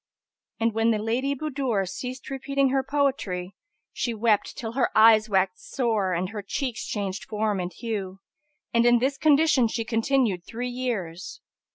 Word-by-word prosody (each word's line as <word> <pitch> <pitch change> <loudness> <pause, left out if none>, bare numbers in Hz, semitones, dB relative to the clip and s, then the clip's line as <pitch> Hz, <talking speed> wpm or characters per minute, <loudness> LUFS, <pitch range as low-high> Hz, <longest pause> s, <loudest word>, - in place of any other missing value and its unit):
And 230 0 +1
when 225 +1 +2
the 225 - +2
Lady 240 +6 -1
Budur 265 -9 -1
ceased 255 +8 -6
repeating 275 0 0
her 270 +1 +2
poetry, 260 -10 -1 0.4
she 235 -2 -2
wept 215 -1 +1
till 225 -2 -4
her 245 +1 +1
eyes 220 0 +6
waxed 190 -2 0
sore 220 -8 +1
and 180 +2 -1
her 215 -1 -5
cheeks 250 +4 -3
changed 200 -2 -3
form 210 -2 -1
and 180 0 -3
hue, 200 -5 -5 0.6
and 235 0 +4
in 240 0 +6
this 270 +3 -1
condition 300 -4 +4
she 225 0 -3
continued 225 -4 +1
three 245 +6 -5
years. 215 - -4
230 Hz, 160 wpm, -25 LUFS, 200-260 Hz, 0.6 s, eyes